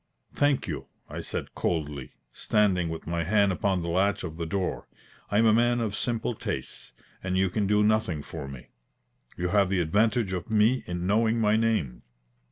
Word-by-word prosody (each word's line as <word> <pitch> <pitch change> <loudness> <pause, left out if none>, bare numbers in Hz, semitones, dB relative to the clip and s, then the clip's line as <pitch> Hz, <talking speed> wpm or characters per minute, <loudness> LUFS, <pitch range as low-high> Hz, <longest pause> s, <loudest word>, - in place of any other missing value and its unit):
"Thank 145 -2 +1
you," 75 -6 -5 0.2
I - - -5
said - - -5
coldly, 75 -5 -3 0.2
standing 95 -5 +1
with 80 0 -6
my 85 0 -1
hand 100 +2 +3
upon 95 -1 0
the - - -4
latch 95 +4 +1
of 80 -3 -6
the 85 -1 -3
door. 95 +2 -2 0.4
"I 105 - +1
am 115 - +5
a 110 - +6
man 120 +1 +3
of 110 -3 -2
simple 120 +1 -1
tastes, - - -5 0.3
and 95 0 -1
you 95 -1 +2
can 100 +1 0
do 105 +1 +3
nothing 105 -8 +1
for 75 -3 -7
me. 70 -2 -10 0.7
You 90 0 -1
have 100 0 +3
the 95 -1 +1
advantage 105 +5 +1
of 90 +1 -4
me 110 +4 +3
in 90 0 -3
knowing 110 +3 +2
my 105 -1 +3
name." 110 - 0
95 Hz, 185 wpm, -27 LUFS, 85-110 Hz, 0.7 s, a